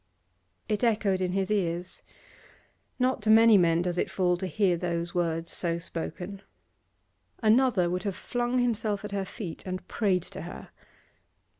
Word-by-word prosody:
It 210 0 -1
echoed 210 -5 +2
in 180 -1 0
his 195 +1 -1
ears; 180 -3 -2 1.0
not 255 -1 +1
to 215 - -1
many 225 0 +7
men 170 -2 +4
does 175 -1 -1
it - - 0
fall 180 -2 +1
to 190 - -3
hear 190 -2 +2
those 170 0 -2
words 165 -1 -1
so 170 -2 -1
spoken. 175 +3 -6 1.0
Another 220 -4 +4
would 180 +1 -1
have 195 -1 -3
flung 245 0 -2
himself 220 -4 0
at 210 - -6
her 200 -1 -2
feet 185 -4 -7
and 185 0 -5
prayed 190 -5 +1
to - - -7
her. 65 +1 -9
190 Hz, 155 wpm, -28 LUFS, 175-215 Hz, 1.0 s, many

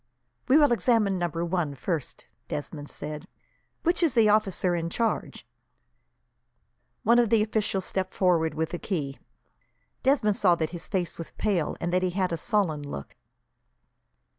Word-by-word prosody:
"We 270 - +6
will 295 -4 +5
examine 225 -5 +2
number 170 -1 -1
one 170 -5 -1
first," 155 0 -4 0.2
Desmond 145 0 -5
said. 150 +3 -6 0.6
"Which 345 +1 +2
is 325 -7 +2
the 225 -2 +5
officer 195 -4 +2
in 165 -1 -2
charge?" 225 +5 -2 1.6
One 235 +1 +5
of 235 -3 +3
the 225 -2 +4
officials 210 -3 -1
stepped 190 -1 -3
forward, 170 -4 +2
with 160 +2 -2
a 175 - -3
key. 145 -9 -3 0.8
Desmond 250 -7 +2
saw 180 -4 +4
that 160 -2 -2
his 175 -2 -6
face 180 -4 -2
was 165 - -7
pale, 190 -7 -1
and 175 +1 -2
that 180 - +3
he 185 - +1
had 185 0 -1
a 165 - -1
sullen 180 -5 0
look. 145 - -7
185 Hz, 155 wpm, -27 LUFS, 165-215 Hz, 1.6 s, We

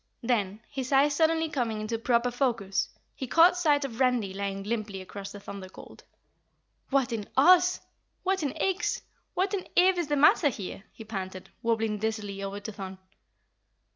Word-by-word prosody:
Then, 215 -4 0
his 265 -1 -5
eyes 280 +1 +4
suddenly 320 +1 +2
coming 235 -7 -2
into 220 +2 -3
proper 240 +1 +2
focus, 235 -7 0 0.2
he 265 - -6
caught 335 +7 +6
sight 295 -5 +2
of 240 -3 -7
Randy 245 -7 +2
lying 195 0 -3
limply 210 -2 -3
across 195 +1 -8
the 205 - -9
Thunder 200 -1 -8
Colt. - - -13 0.9
"What 270 -3 +1
in 210 -3 -4
Oz? 360 +5 +6 0.4
What 385 0 +1
in 285 -3 -1
Ix? 385 +5 0 0.3
What 380 +3 0
in 385 -3 -2
Ev 365 0 +5
is 340 - -1
the 295 - +1
matter 290 +1 +5
here?" 200 -3 -7
he 225 - -11
panted, 190 -3 -6
wobbling 225 -2 0
dizzily 210 -2 -3
over 200 +1 -4
to 220 - -6
Thun. 190 -2 -7
235 Hz, 170 wpm, -28 LUFS, 200-290 Hz, 0.9 s, caught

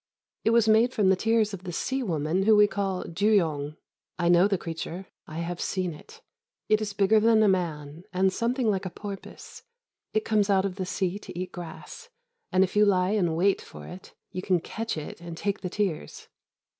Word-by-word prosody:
It - - +3
was 230 -1 +4
made 225 +3 +4
from 205 -4 +3
the 190 - +5
tears 220 +1 +1
of 190 - -6
the 180 - -5
sea 265 +10 -2
woman 165 - 0
whom 215 +2 +5
we 210 - +8
call 195 -2 -2
dûyong. 165 -6 +1 0.4
I 175 -1 +1
know 175 +2 +6
the 200 -2 +1
creature. 165 +2 -6 0.2
I 155 - -8
have 175 +1 -4
seen 185 -3 -1
it. 150 - -15 0.4
It 215 0 +3
is 210 -1 -2
bigger 200 +2 +4
than 220 0 +4
a - - +5
man, 165 -3 -2
and 190 0 +2
something 240 +2 0
like 195 -2 0
a - - -4
porpoise. 200 +2 -9 0.5
It 215 - 0
comes 210 -2 +2
out 195 -1 +3
of 195 -1 -3
the 185 -2 -3
sea 190 +1 -1
to 175 - -10
eat 185 +1 -4
grass, 175 - -9 0.4
and, 185 0 +4
if 185 - -3
you 210 - +6
lie 185 -2 +3
in 180 -6 +1
wait 195 +4 +2
for - - -11
it, 185 +1 -11 0.2
you 185 - -4
can 185 -2 +2
catch 225 +4 -4
it 155 +2 -7
and 170 -1 -8
take 200 +2 -2
the 180 - -3
tears. 185 - -3
190 Hz, 205 wpm, -27 LUFS, 175-210 Hz, 0.5 s, we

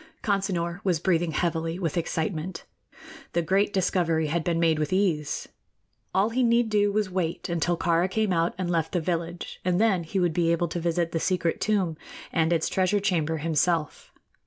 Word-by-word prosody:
Consinor 190 -3 -1
was 180 -5 +1
breathing 170 -1 +1
heavily 165 +1 -1
with 170 -5 -2
excitement. 165 0 -3 0.7
The 170 - +1
great 195 +5 +2
discovery 165 -5 +1
had 165 +1 0
been 170 0 0
made 165 -2 +3
with 150 -1 -1
ease. 180 -6 0 0.6
All 200 +4 +2
he 255 +3 +1
need 235 -1 +3
do 205 -1 +2
was 210 +1 +1
to 185 - -12
wait 175 -2 -2
until 170 0 0
Kāra 170 +2 +2
came 215 -1 0
out 165 0 +1
and 185 -1 -2
left 165 -2 -1
the 180 - +2
village, 170 +1 -4
and 180 0 +1
then 200 -6 +3
he 190 +4 -2
would 175 -3 +1
be 170 0 +2
able 170 0 +1
to 175 - -3
visit 170 0 0
the 165 - -1
secret 175 -1 0
tomb 190 -7 +1 0.4
and 160 0 +2
its 165 -2 +2
treasure 190 +2 +1
chamber 165 -5 0
himself. 160 0 0
175 Hz, 185 wpm, -26 LUFS, 165-190 Hz, 0.7 s, made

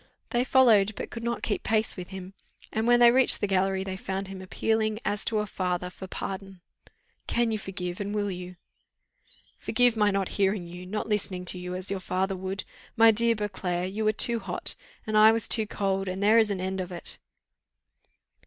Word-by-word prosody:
They 240 0 +2
followed, 230 -6 +4
but - - -6
could 230 - -7
not 235 0 -3
keep 205 - -1
pace 220 0 0
with 180 -2 -7
him; 190 0 -8 0.4
and 220 +1 0
when 240 0 +5
they 240 -1 +8
reached 260 +1 +5
the - - 0
gallery, 190 -1 +1
they 190 -1 -5
found 190 0 -4
him 190 -1 -8
appealing, 215 +3 -1
as 205 0 0
to 225 - 0
a 210 - 0
father, 180 -2 -3
for 190 - -9
pardon. 195 -1 -6 0.7
"Can 235 -1 +1
you 215 - -1
forgive, 180 -2 -5
and 200 0 -3
will 205 -1 -1
you?" 180 0 -7 1.0
"Forgive 245 -2 +2
my 210 -2 +3
not 195 -2 -1
hearing 195 -2 0
you, 180 +1 -9
not 210 +3 -3
listening 195 -4 -1
to 180 +1 0
you, 180 0 -5
as 185 +1 -4
your 195 - -2
father 190 +1 -1
would? 190 +1 -4 0.3
My 225 0 +7
dear 230 +1 +2
Beauclerc, 190 -3 -3
you 220 +2 -2
were 215 - +3
too 235 +2 +2
hot, - - -1 0.3
and 215 -1 -2
I 215 +1 +8
was 225 -1 0
too 220 -2 +3
cold; 195 -1 -1
and 185 +2 -3
there 220 +3 +6
is 220 -2 +3
an 200 -2 -2
end 190 +1 -2
of 180 0 -6
it." 175 - -6
195 Hz, 205 wpm, -27 LUFS, 185-220 Hz, 1.0 s, they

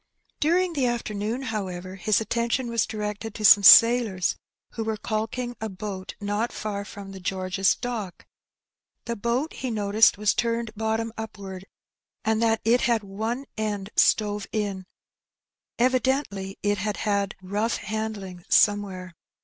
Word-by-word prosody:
During 350 +3 +2
the 270 -5 +1
afternoon, 230 +1 -2
however, 185 -6 -4
his 195 +2 +1
attention 235 +2 -1
was 230 -2 +1
directed 210 0 -5
to 215 - -2
some 200 0 +9
sailors 225 -3 +7 0.4
who 225 - -4
were 220 -1 -2
caulking 225 +3 -3
a 220 - -3
boat 190 -1 -6
not 205 +3 -1
far 205 -2 -4
from 200 -1 -9
the 190 - -9
George's 190 +1 0
Dock. 230 -7 -5 0.8
The 235 - -3
boat 235 +8 -1
he 260 - -4
noticed 210 -1 +3
was 210 0 +2
turned 230 -1 -1
bottom 220 +1 -2
upward, 195 -4 -7 0.6
and 220 0 +1
that 225 -1 +2
it 240 +2 +4
had 230 -3 +1
one 220 +7 -4
end 205 -2 -3
stove 210 -2 +2
in; 200 -4 -3 0.9
evidently 255 -6 0
it 205 -1 +1
had 210 +1 -2
had 200 -2 -1
rough 205 +5 -1
handling 215 -5 -5
somewhere. 195 -3 +2
215 Hz, 140 wpm, -25 LUFS, 200-230 Hz, 0.9 s, some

